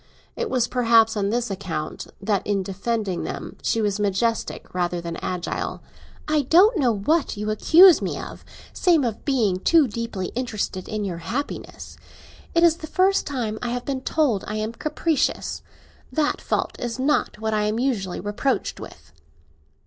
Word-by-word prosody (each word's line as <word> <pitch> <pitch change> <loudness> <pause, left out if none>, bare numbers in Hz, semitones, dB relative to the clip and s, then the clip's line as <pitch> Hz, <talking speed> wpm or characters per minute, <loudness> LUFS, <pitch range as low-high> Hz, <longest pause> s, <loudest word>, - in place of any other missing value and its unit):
It - - -2
was 250 -2 +1
perhaps 230 -3 +4
on 200 -1 0
this 235 0 -1
account 185 -5 -4
that 200 -1 0
in 200 -2 +1
defending 200 0 -2
them - - -6
she 225 - 0
was 205 0 0
majestic 205 +3 -1
rather 175 -1 -1
than 170 -1 -5
agile. 180 -1 -4 0.4
"I 305 -1 +2
don't 360 - +5
know 250 -5 +3
what 250 +7 0
you 210 +1 -2
accuse 340 - +7
me - - -2
of, - - -8 0.3
save 335 -5 +3
of 230 -4 -3
being 230 -10 +2
too 315 - +4
deeply 225 -4 -4
interested 215 -6 -3
in 215 -1 -2
your 175 -3 -4
happiness. 240 +12 -5 0.6
It 335 - +4
is 335 -1 +5
the 315 - -8
first 380 +4 +2
time 230 -6 -3
I 245 - -2
have 245 0 -3
been 270 -2 -2
told 260 -10 +1
I 210 - -3
am 215 +1 -2
capricious. 305 +3 -1 0.5
That 305 -2 0
fault - - -2
is 240 -1 -3
not 275 -3 +1
what 220 0 -2
I 210 -1 +1
am 215 +1 0
usually 230 -8 -1
reproached 210 +4 -1
with." 70 - -12
230 Hz, 165 wpm, -23 LUFS, 200-275 Hz, 0.6 s, accuse